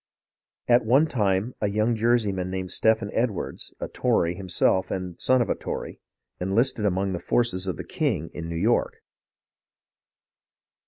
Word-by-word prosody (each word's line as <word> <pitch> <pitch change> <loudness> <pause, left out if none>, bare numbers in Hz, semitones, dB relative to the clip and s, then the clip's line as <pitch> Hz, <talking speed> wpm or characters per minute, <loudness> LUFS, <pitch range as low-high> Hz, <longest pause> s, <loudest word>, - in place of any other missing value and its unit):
At 120 0 +5
one 130 +8 +4
time 105 -4 0
a 105 - +2
young 110 +3 +1
Jerseyman 105 -5 +1
named 95 -1 -4
Stephen 110 -2 +2
Ed 120 +2 +2
wards, 100 - -6
a - - -3
Tory 85 0 +1
himself 95 0 +1
and 90 -2 -4
the - - -38
son 130 -1 +4
of - - -7
a - - +4
Tory, - - -6 0.4
enlisted 105 +4 +1
among 95 0 0
the 90 - -3
forces 95 -5 0
of 90 - -2
the - - -5
king 80 +2 -2
in 85 -1 -6
New 85 - -4
York. 110 +8 0
100 Hz, 160 wpm, -25 LUFS, 95-115 Hz, 0.4 s, At